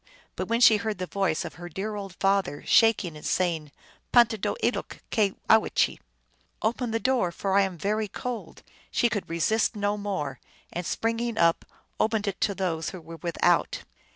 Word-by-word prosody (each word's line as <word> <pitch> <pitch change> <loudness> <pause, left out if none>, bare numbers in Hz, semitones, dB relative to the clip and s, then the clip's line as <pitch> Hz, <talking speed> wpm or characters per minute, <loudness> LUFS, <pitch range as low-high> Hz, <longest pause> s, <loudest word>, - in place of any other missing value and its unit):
But - - -3
when 230 +1 +1
she 220 -3 +8
heard 215 -1 -3
the 185 - -3
voice 190 -2 -1
of 170 - -6
her 175 - -6
dear 200 +5 -4
old 195 -3 -6
father, 195 -7 +1
shaking 215 -7 +4
and 150 - -11
saying, 165 -5 0 0.2
" - - -32
Pantahdooe 230 - +4 0.2
loke - - -6
cyowchee!" 215 +1 +2 0.3
" - - -40
Open 235 +2 0
the 225 0 0
door, 245 -8 +1
for 190 +3 -2
I 200 - +6
am 190 -3 -1
very 210 +5 -1
cold! 245 +4 -6
" - - -27
she 240 - +2
could 205 -3 -3
resist 215 +8 +1
no 205 0 0
more, 185 -11 -3 0.3
and, 175 0 -3
spring 230 0 -1
ing 235 -2 -2
up, 165 -1 +3 0.3
opened 220 -1 +1
it 195 - -3
to 200 - +1
those 165 -5 -1
who 185 - -8
were 165 0 -10
without. 170 0 +1
200 Hz, 185 wpm, -27 LUFS, 175-220 Hz, 0.3 s, she